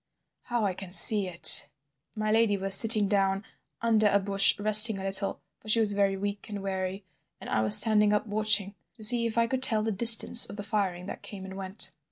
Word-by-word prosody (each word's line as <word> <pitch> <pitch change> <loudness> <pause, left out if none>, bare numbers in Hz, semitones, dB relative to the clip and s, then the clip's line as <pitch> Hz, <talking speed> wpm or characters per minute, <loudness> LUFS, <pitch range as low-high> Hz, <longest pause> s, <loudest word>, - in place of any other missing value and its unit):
How 240 -3 -6
I 195 - -6
can 185 0 -14
see 195 +2 +6
it! 170 -2 +2 0.5
My 215 0 -7
lady 220 -2 -3
was 195 0 0
sitting 215 0 +2
down 195 0 -5 0.4
under 220 -2 -2
a 200 - -2
bush 195 0 -1
resting 215 +1 +5
a 190 - -12
little, 195 +1 -2 0.2
for 215 - -17
she 230 - -1
was 210 -2 0
very 200 -1 -5
weak 205 +2 -10
and 205 -2 -11
weary, 190 0 -9 0.3
and - - -15
I 110 - -4
was 110 0 +6
standing 210 -1 +2
up 210 +1 -5
watching 210 -2 -3 0.2
to 220 - -16
see 235 +2 +2
if 230 - -11
I 230 - -2
could 260 +2 -8
tell 220 -4 0
the 220 - -6
distance 230 +3 +4
of - - -14
the 205 - -12
firing 195 -4 -8
that - - -13
came 195 -2 -15
and 190 0 -14
went. 190 +1 -6
205 Hz, 220 wpm, -22 LUFS, 195-215 Hz, 0.5 s, see